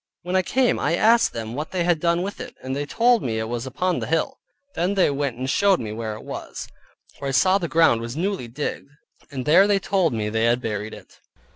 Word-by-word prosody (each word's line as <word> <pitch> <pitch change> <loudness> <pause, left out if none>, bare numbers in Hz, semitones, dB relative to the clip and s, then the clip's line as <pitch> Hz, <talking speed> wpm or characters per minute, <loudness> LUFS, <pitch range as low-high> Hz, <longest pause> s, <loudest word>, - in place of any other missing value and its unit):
When 180 +2 -3
I 185 - +4
came 250 +6 +1
I 160 +4 +1
asked 230 +5 +4
them 115 0 -6
what 150 +4 -4
they 180 -2 -1
had 175 -2 +2
done 170 +1 +1
with 200 +2 -5
it; - - -8
then 130 0 -4
they 145 +1 -3
told 235 +5 +3
me 115 -3 -2
it 110 - -2
was 120 +2 -4
upon 180 +7 -1
the - - -4
hill. 165 - -1 0.3
Then 180 +4 -1
they 185 -6 +3
went 140 -3 -2
and 130 +1 -3
showed 195 +6 +3
me 110 -2 -5
where 110 0 -4
it 110 - -11
was, - - -7 0.5
where 140 - -4
I - - -1
saw 185 +8 +3
the 170 - -2
ground 165 -9 +3
was 120 +4 -6
newly 190 -7 -2
digged, 140 +3 -5 0.4
and 130 -3 -5
there 180 +7 +6
they 205 -1 +3
told 190 -4 +1
me 110 -2 -2
they 110 +1 0
had 120 +1 +3
buried 105 -3 -4
it. - - -16
150 Hz, 245 wpm, -23 LUFS, 120-185 Hz, 0.5 s, there